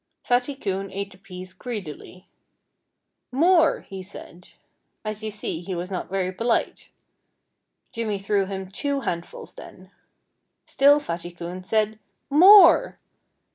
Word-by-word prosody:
Fatty 245 +3 0
Coon 195 -6 -3
ate 200 +1 -5
the 185 - -16
peas 185 -1 -10
greedily. 185 - -8 1.1
"More!" 325 +4 +3
he 195 -1 -9
said. 180 -1 -11 0.6
As 215 0 -4
you 215 - -3
see, 205 -5 -3
he 185 +1 -5
was 175 +2 -5
not 185 - -4
very 185 -1 -1
polite. 230 +5 -1 1.0
Jimmy 220 -3 -2
threw 195 0 0
him 190 -1 -6
two 280 +6 -2
handfuls 170 -7 -5
then. 185 +1 -13 0.7
Still 285 +2 +4
Fatty 175 - -5
Coon 175 +1 -8
said 215 +2 0 0.3
"More!" 380 +7 +7
195 Hz, 125 wpm, -24 LUFS, 185-240 Hz, 1.1 s, More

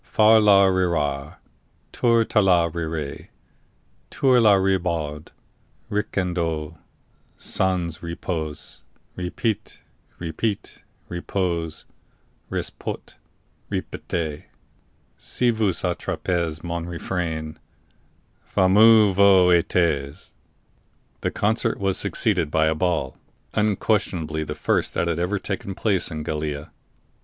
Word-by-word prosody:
Far 110 +1 +5
la 100 -2 +6
rira, 85 -6 0 0.5
Tour 115 -2 +3
tala 90 -7 +3
rire, 80 -3 -5 0.8
Tour 130 -3 +3
la 105 -3 +6
Ribaud, 85 -6 -1 0.6
Ricandeau, 85 -6 -2 0.6
Sans 90 -4 -1
repos, 85 -2 -5 0.3
repit, 100 +4 -3 0.4
repit, 90 +5 -3 0.3
repos, 85 -2 -3 0.6
ris - - -2
pot, - - -7 0.6
ripette! 80 -3 -4 0.7
Si 125 -1 +1
vous 110 -3 +1
attrapez 85 -3 -2
mon 85 -1 -3
refrain, 80 -3 -4 0.8
Fameux 105 +2 +5
vous 95 -2 +6
etes."_ 80 -5 +1 0.9
The - - 0
concert 110 +3 0
was 95 -1 0
succeeded 90 -9 0
by 80 +1 +2
a 80 - +2
ball, 80 -5 -1 0.3
unquestionably 100 -7 0
the - - -5
first - - 0
that 85 - 0
had 85 -1 -1
ever 90 +4 0
taken 100 0 -5
place 95 -4 0
in 80 -2 -5
Gallia. 75 -1 -4
90 Hz, 95 wpm, -23 LUFS, 80-100 Hz, 0.9 s, la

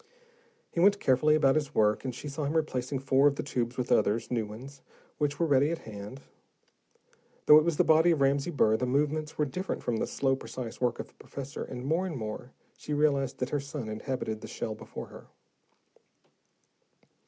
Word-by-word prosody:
He - - -3
went 200 +3 +5
carefully 150 +2 +3
about 135 -3 +4
his 150 -1 -2
work, 105 -1 +3
and 130 -3 -4
she 150 - -7
saw 145 +1 -4
him 145 +3 -2
replacing 135 -3 -1
four 135 +1 +3
of 140 - +2
the - - -3
tubes 125 -3 -2
with 125 -1 -2
others, 110 +4 +2
new 115 -3 0
ones, 130 +6 -10 0.4
which 145 -1 -1
were 170 - +3
ready 145 -1 +3
at 170 - -1
hand. 105 +5 -8 1.2
Though 150 0 +9
it - - +1
was 165 -2 0
the - - +5
body 160 +2 +5
of 165 -3 +2
Ramsey 140 +3 +2
Burr, 110 -9 +3
the 125 - -1
movements 150 +3 0
were 150 - +2
different 185 +8 -4
from 120 -2 -1
the - - -1
slow, 135 -1 +1
precise 130 -3 -7
work 120 -1 +1
of - - -7
the - - -26
professor, 140 0 -7
and 125 0 -7
more 165 +6 +1
and 160 -6 -5
more, 110 +2 -6 0.2
she 150 - -4
realized 140 -3 +1
that 125 - -3
her 145 - +1
son 140 -4 -6
inhabited 110 -1 -4
the - - -8
shell 110 - -4
before - - -9
her. - - -13
135 Hz, 200 wpm, -29 LUFS, 125-150 Hz, 1.2 s, Though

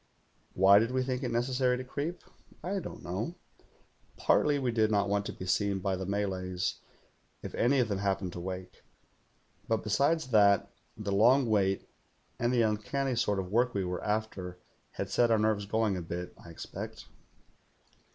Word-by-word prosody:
Why 95 +2 +7
did 115 +2 +1
we 130 0 0
think 130 0 -2
it 125 - -2
necessary 125 +1 +1
to 130 - -5
creep 145 +7 -4
.^ - - -23 0.3
I 195 +3 -1
don't 175 - -8
know. 95 - -3 0.8
Partly 145 -1 +3
we 130 -3 0
did 110 -2 +2
not 100 -2 +2
want 100 0 0
to - - -3
be 95 - -8
seen 100 +2 +1
by 95 0 -1
the 95 0 -5
Malays, 95 -2 -2 0.6
if - - -6
any 130 +4 +2
of 125 -3 +3
them 100 -2 -2
happened 95 -2 -1
to - - -6
wake; 90 +1 -6 0.9
but 115 -1 0
besides 140 +7 +1
that, 100 -3 +4 0.3
the 100 -1 -3
long 120 +7 +5
wait 95 -3 +1 0.5
and 120 +1 +1
the 120 -2 +3
uncanny 120 +5 0
sort 105 -3 +1
of 95 -1 -3
work 120 +2 +2
we 95 -2 0
were 90 0 -3
after 105 -4 -2 0.4
had - - -4
set 120 -1 +3
our 115 - +4
nerves 105 -1 +1
going 110 -1 +1
a 90 - -3
bit, 85 +1 -5
I - - -12
expect. 85 - -7
105 Hz, 180 wpm, -30 LUFS, 95-125 Hz, 0.9 s, Why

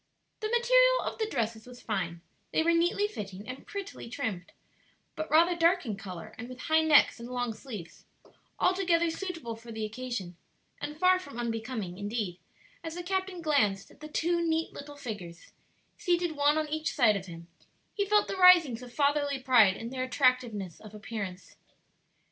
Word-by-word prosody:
The 430 - -2
material - - +4
of - - -4
the 440 - 0
dresses 225 - -3
was 250 -1 -11
fine, 180 -6 -3 0.3
they - - +2
were 335 - +3
neatly 345 +5 +2
fitting 200 - -7
and 255 +1 -8
prettily 395 - -7
trimmed, 220 -9 -4 0.6
but 315 - -4
rather 340 +3 +5
dark 345 0 +3
in 215 -4 -3
color 185 -3 -8
and 240 +2 -7
with 255 0 -9
high 320 -1 +3
necks 310 -5 +5
and 235 +1 -8
long 245 -2 -2
sleeves; 215 - -9 0.5
altogether 350 -3 +2
suitable 330 -10 -5
for 230 +1 -12
the 220 -1 -3
occasion, 215 -6 -5 0.4
and 300 +1 -5
far 370 +2 +4
from 285 -9 -10
unbecoming; 225 -5 -4
indeed, 205 -3 -3 0.4
as 325 0 -5
the 355 - -5
captain 375 -1 -2
glanced 215 -11 +1
at - - -20
the 305 - -8
two 340 +3 +1
neat 325 0 0
little 290 0 -9
figures, 205 -11 -8 0.5
seated 350 -1 +1
one 295 0 +3
on 310 -1 0
each 310 +1 -2
side 240 -7 +5
of 195 -1 -5
him, 170 -1 -10 0.5
he 405 - 0
felt 420 +1 +3
the - - -4
risings 345 -10 +7
of 250 -1 -10
fatherly 285 0 +1
pride 245 -7 +5
in 230 +1 -6
their 260 -1 -3
attractiveness 250 - +1
of 215 -1 -12
appearance. 210 -4 -7
260 Hz, 175 wpm, -29 LUFS, 220-335 Hz, 0.6 s, risings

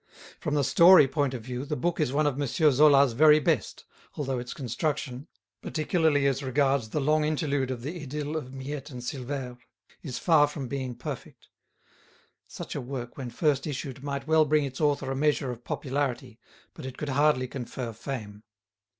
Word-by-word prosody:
From 150 - -2
the 145 - +2
"story" 170 -1 +7
point 140 -2 -1
of 120 - -7
view 125 +2 -5
the 150 +1 -3
book 170 +6 -1
is 150 -5 +1
one 150 +2 +1
of 145 -1 0
M. 140 - 0
Zola's 140 -1 +5
very 150 +4 +6
best, 150 - -1 0.3
although 135 -3 -2
its 120 0 -7
construction—particularly 145 - -2
as 135 0 +1
regards 135 -3 +1
the 150 - -1
long 150 +2 +2
interlude 145 -3 0
of 125 -2 -4
the 165 +5 -5
idyll 150 +2 -4
of 130 -5 -4
Miette 135 +1 -6
and 125 -3 -8
Silvère—is 125 0 -7
far 155 -4 +4
from 145 -3 -6
being 130 -1 -4
perfect. - - -8 1.0
Such - - -7
a - - -3
work 125 -1 -6
when 130 -3 -6
first 145 +1 0
issued 135 -2 -5
might 140 -1 -4
well 160 0 +4
bring 150 0 +2
its 135 +1 -6
author 145 -3 +1
a - - -2
measure 140 -2 +1
of 120 0 -9
popularity, 130 -3 -3 0.3
but 145 -5 -8
it 130 - -8
could 150 - -4
hardly 140 -1 +2
confer 125 -2 -6
fame. 105 -4 -7
140 Hz, 175 wpm, -27 LUFS, 130-150 Hz, 1.0 s, story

